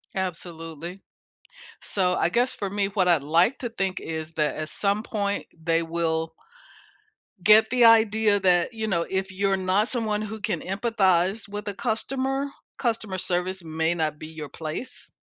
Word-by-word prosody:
Absolutely. 170 -1 -5 0.8
So, 180 -2 +1
I 170 - +1
guess 245 +6 +2
for 200 - -4
me, 200 0 0
what 195 -2 0
I'd 170 -5 +4
like 170 - +3
to 240 - -3
think 195 -5 -2
is 160 -1 -5
that, 150 -1 0
at 155 -1 -4
some 200 +1 0
point 205 -3 -2
they 165 0 0
will 165 -1 -1 1.1
get 215 +3 +6
the 245 -1 +4
idea 220 -2 +5
that, 180 +3 +3
you 220 -1 -3
know, 170 -5 0
if 190 0 -2
you're 195 +1 +1
not 190 +3 +1
someone 220 -4 0
who 215 0 -6
can 215 0 -1
empathize 195 -1 +1
with 205 +1 -5
the 205 - -3
customer, 265 +6 -1 0.3
customer 225 -6 -1
service 180 +1 -1
may 160 +1 0
not 155 -3 -2
be 155 - -7
your 155 -2 -8
place? 160 - -6
190 Hz, 160 wpm, -25 LUFS, 170-215 Hz, 1.1 s, get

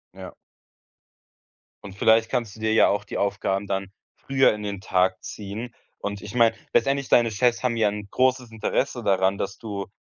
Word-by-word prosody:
Ja. - - -9 1.5
Und 100 -1 -9
vielleicht 110 +2 +4
kannst 115 -5 -2
du - - -14
dir 110 0 0
ja - - +6
auch 105 +1 0
die - - -5
Aufgaben 100 0 -1
dann 95 0 -2 0.3
früher 135 -3 +2
in 105 0 -7
den 100 -2 -4
Tag 95 -1 +1
ziehen. 110 +4 -7 0.3
Und 100 -1 -5
ich 105 +4 -9
meine, 115 -2 +4 0.2
letztendlich, 140 0 +1
deine 115 -2 +4
Chefs 120 +3 +1
haben 120 -2 0
ja 110 -2 +3
'n 105 0 -6
großes 130 -2 +1
Interesse 120 +3 -2
daran, 95 -1 +2
dass 100 0 -4
du 100 -4 -6
105 Hz, 180 wpm, -24 LUFS, 100-120 Hz, 1.5 s, ja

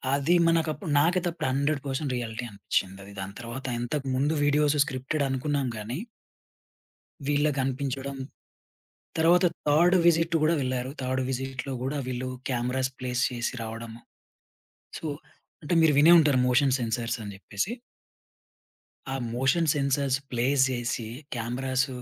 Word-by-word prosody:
అది 145 +5 +2
మనకప్పు 165 +2 +1
నాకైతే 175 +3 +2
అప్పుడు 165 - -3
100% 140 0 -1
రియాలిటీ 115 0 -4
అనిపించింది. 100 0 -3
దాని 95 +1 -6
తర్వాత 120 +3 -7 0.2
ఇంతకు 135 +3 -3
ముందు 145 +4 +1
వీడియోస్ 150 0 +3
స్క్రిప్టెడ్ 135 +3 -2
అనుకున్నాం 135 +1 -1
గాని 110 +6 -4 1.3
వీళ్ళకి 145 -1 +2
అనిపించడం. 135 +1 -3 1.0
తర్వాత 175 +3 +5 0.2
థర్డ్ 170 +5 +5
విసిట్ 165 0 +4
కూడా 160 +2 +4
వెళ్లారు. 130 0 -2
థర్డ్ 130 0 -1
విసిట్‌లో 135 +1 -3
కూడా 140 +3 -2
వీళ్ళు 130 0 -3 0.2
కెమెరాస్ 130 +1 -1
ప్లేస్ 125 0 -1
చేసి 120 0 -2
రావడము. 115 +1 -7 1.0
సో, - - -9 0.6
అంటే 150 - -1
మీరు 160 -2 +5
వినే 165 +4 +8
ఉంటారు 145 -5 +3
మోషన్ 130 +1 +3
సెన్సార్స్ 115 0 -2
అని 100 -1 -6
చెప్పేసి. 105 - -3 1.4
ఆ - - -1 0.2
మోషన్ 145 +6 +2
సెన్సార్స్ 140 -1 +1
ప్లేస్ 130 +3 +2
చేసి 120 -2 -2 0.3
కెమెరాస్ 125 +3 -1
135 Hz, 125 wpm, -27 LUFS, 125-150 Hz, 1.4 s, వినే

